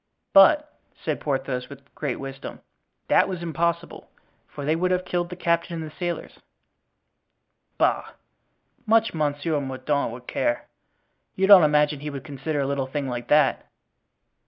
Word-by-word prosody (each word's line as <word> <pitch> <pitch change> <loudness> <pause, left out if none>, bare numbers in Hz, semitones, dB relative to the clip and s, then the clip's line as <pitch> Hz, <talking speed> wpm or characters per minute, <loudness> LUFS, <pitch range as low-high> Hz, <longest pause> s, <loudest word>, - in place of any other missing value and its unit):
"But," 300 +10 +5 0.2
said - - -2
Porthos, 130 -3 -2
with 140 0 -14
great 140 -5 -3
wisdom, 135 0 -8 0.5
"that - - +4
was 180 -2 -5
impossible, 170 +1 -2 0.4
for 145 - -8
they 155 +2 +2
would 180 +2 0
have 185 0 0
killed 175 -1 -2
the 180 - -6
captain 170 -1 0
and 165 - -4
the - - -22
sailors." 175 -2 -5 1.4
"Bah! - - +1 0.7
much 225 +1 +3
Monsieur 150 0 -1
Mordaunt 135 0 -2
would 120 +1 -10
care. 300 - -1 0.7
You 190 - +2
don't 195 -2 +9
imagine 150 -1 +3
he 150 +1 -5
would 140 -2 -7
consider 145 +1 -3
a - - 0
little 135 -1 -1
thing 140 0 -3
like 120 -1 -5
that?" 150 +1 +3
150 Hz, 150 wpm, -24 LUFS, 140-175 Hz, 1.4 s, don't